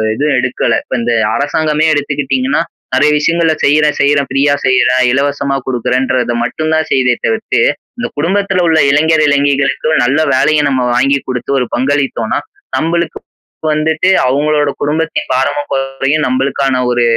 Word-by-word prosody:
இது 145 +5 -1
எடுக்கல. 130 0 0
இப்ப - - -5
இந்த 120 0 0 0.2
அரசாங்கமே 155 +2 0
எடுத்துக்கிட்டீங்கன்னா 145 - -1 0.3
நெறைய 150 - +3
விஷயங்களை 165 +1 +1
செய்றேன், 150 +1 +2
செய்றேன், 140 0 +2
ஃப்ரீயா 140 +2 +2
செய்யிறேன். 130 -1 +3
இலவசமா 140 +1 -1
குடுக்குறேன்றத 125 0 -1
மட்டும் 155 +5 -2
தான் 160 -1 +1
செய்யுதே 125 -2 +2
தவிர்த்து, 225 0 0 0.4
இந்த 245 - -3
குடும்பத்தில 190 +3 0
உள்ள 160 -1 +3
இளைஞர் 155 +2 +3
இளைஞிகளுக்கும் 140 +1 +1
நல்ல 135 +5 +1
வேலைய 150 +4 +2
நம்ம 130 -2 0
வாங்கி 140 +2 +2
குடுத்து 125 +1 -3
ஒரு 125 - 0
பங்களித்தோன்னா 130 -3 -1 0.4
நம்பளுக்கு 170 +3 -1 0.5
வந்துட்டு 160 +4 0 0.2
அவுங்களோட 145 +2 +1
குடும்பத்தின் 155 +1 -2
பாரமும் 145 +3 -1
குறையும். 135 +2 -1
நம்பளுக்கான 135 0 0
ஒரு 120 -1 +1
145 Hz, 135 wpm, -13 LUFS, 130-155 Hz, 0.5 s, நெறைய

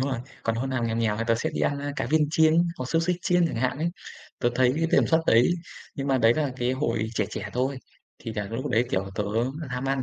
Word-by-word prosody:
rồi, 130 -2 -1 0.2
còn 115 - 0
hôm 130 +3 -2
nào 120 -3 -1
nghèo 115 0 -1
nghèo 110 -2 +1
thì 115 - -2
tớ 115 - +3
sẽ 115 - -2
đi - - -3
ăn, 140 -1 +1
a, 145 0 -4
cá - - -1
viên 150 +1 +2
chiên 160 -1 +4 0.2
hoặc 130 - -3
xúc 165 0 +2
xích 180 0 +1
chiên 180 -2 +3
chẳng 155 - -4
hạn 130 +4 0
ấy. 170 +2 0 0.5
Tớ 120 - +2
thấy 125 0 +3
cái 165 +1 +1
tần - - +5
suất 160 0 +3
đấy 115 +2 +5 0.5
nhưng 140 0 -4
mà 135 -1 +2
đấy 115 -1 +5
là 145 -4 -1
cái 125 0 0
hồi 130 -5 -1
trẻ 105 - +1
trẻ 100 0 -5
thôi, 130 +2 -1 0.4
thì 115 - -6
là 105 - -2
lúc 115 +3 -3
đấy, 120 +2 +2
kiểu, 95 +1 -1
tớ 105 - -1 0.4
ham 125 +1 -4
ăn, 135 -1 0
130 Hz, 270 wpm, -26 LUFS, 115-145 Hz, 0.5 s, tần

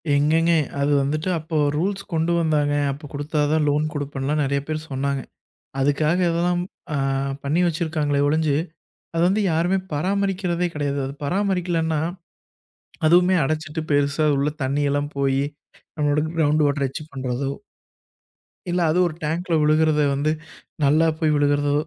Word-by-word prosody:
எங்கங்க? 160 +4 +3 0.3
அது 145 +1 +2
வந்துட்டு 155 +5 -1
அப்போ 160 +1 -6 0.2
ரூல்ஸ் 195 +5 -1
கொண்டு 165 +1 +1
வந்தாங்க. 150 -3 +1 0.2
அப்பக் 145 +1 -9
குடுத்தா 150 +2 -2
தான் 155 -1 +2
லோன் 150 +1 +1
குடுப்பன்லாம் 145 +1 -2
நெறையா 140 0 0
பேர் 155 0 -4
சொன்னாங்க. 135 0 -1 0.6
அதுக்காகல்லாம் 170 +5 +1 0.3
அ - - 0 0.5
பண்ணி 150 +5 +1
வச்சிருக்காங்களே 155 -3 0
ஒழிஞ்சு, 155 -1 +2 0.6
அத 165 - +1
வந்து 210 +3 +1
யாருமே 175 +4 +2
பராமரிக்கிறதே 185 +1 0
கிடையாது. 140 -2 -1 0.2
பராமரிக்கலன்னா, 175 -3 0 1.1
அதுமே 180 +3 +5
அடச்சுட்டு 155 +2 -2
பெருசா 145 +2 +2
உள்ள 140 +2 +1
தண்ணில்லாம் 145 +2 0
போயி, 135 0 +1 0.5
நம்மளோட 150 -1 +1
க்ரௌண்ட் 155 -1 +3
வாட்டர 140 -1 +1
வச்சு 135 +3 -6
பண்றதோ 130 0 -2 1.2
இல்ல, 175 +1 0
அது 175 - +2
ஒரு 165 - -5
டேங்க்ல 170 +4 -2
ஒழுகுறத 155 0 +3
வந்து, 145 +3 +1 0.5
நல்லா 155 +4 +4
போய் 155 -2 +2
விழுகறதோ, 145 0 +2
155 Hz, 125 wpm, -22 LUFS, 145-165 Hz, 1.2 s, அதுமே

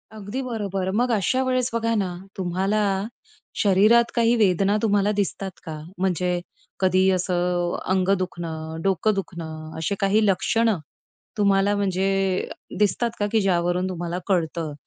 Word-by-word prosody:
अगदी 215 +5 -5
बरोबर. 200 -6 -3
मग 245 +2 +2
अशा 225 +5 +1
वेळेस 255 -1 +1
बघा 230 0 0
ना. 195 -3 0 0.3
तुम्हाला 190 +3 0 0.8
शरीरात 215 +4 +5
काही 235 0 +3
वेदना 200 -1 +3
तुम्हाला 205 -2 +2
दिसतात 200 -1 -2
का? 155 -1 -6 0.2
म्हणजे 180 -1 0 0.5
कधी 185 0 +3
असं 180 -1 0
अ - - -4
अंग 185 0 +1
दुखणं, 165 -3 -5
डोकं 195 +3 +2
दुखणं 160 -4 -6
असे 200 +5 -1
काही 205 +2 +3
लक्षणं 210 +1 +2 0.6
तुम्हाला 200 0 +3
म्हणजे 195 -1 0 0.7
दिसतात 220 +3 +2
का? 205 - +1
की 220 -2 +3
ज्यावरून 180 0 +1
तुम्हाला 175 0 -3
कळतं, 165 -4 -1
195 Hz, 135 wpm, -24 LUFS, 180-210 Hz, 0.8 s, शरीरात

